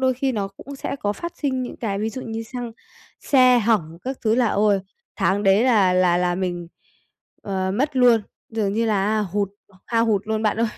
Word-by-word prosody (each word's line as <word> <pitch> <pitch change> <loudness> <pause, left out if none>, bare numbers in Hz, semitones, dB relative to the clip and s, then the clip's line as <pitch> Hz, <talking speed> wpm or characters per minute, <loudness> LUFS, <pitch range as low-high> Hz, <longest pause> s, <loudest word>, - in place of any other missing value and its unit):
đôi 260 -1 +2
khi 265 +1 -1
nó 205 -4 -2
cũng 270 +8 -11
sẽ 275 - -4
có 205 -6 -1
phát 340 +10 -6
sinh 260 -3 -1
những 250 - -6
cái 200 -4 -3
ví 220 +2 -1
dụ 255 +4 -6
như 225 0 -5
xăng, 240 0 -6 0.5
xe 255 -3 +5
hỏng 195 -8 0
các 265 +1 -3
thứ 220 0 +3
là 245 -1 +3
ôi 205 -1 +2 0.4
tháng 200 +2 +1
đấy 195 +4 +4
là 205 -7 +4
là 180 -1 +3
là 180 0 +1
mình, 175 -2 -3 0.7
ờ, 190 -1 -2
mất 275 +5 -1
luôn, 245 -3 +5 0.3
dường 215 -3 -1
như 230 +2 0
là 205 -3 +1
á 215 0 +1
hụt, 200 0 -1 0.4
hao 230 0 +1
hụt 205 -3 +1
luôn 220 0 -1
bạn 215 - +1
ơi! 230 0 +2
220 Hz, 215 wpm, -22 LUFS, 195-245 Hz, 0.7 s, xe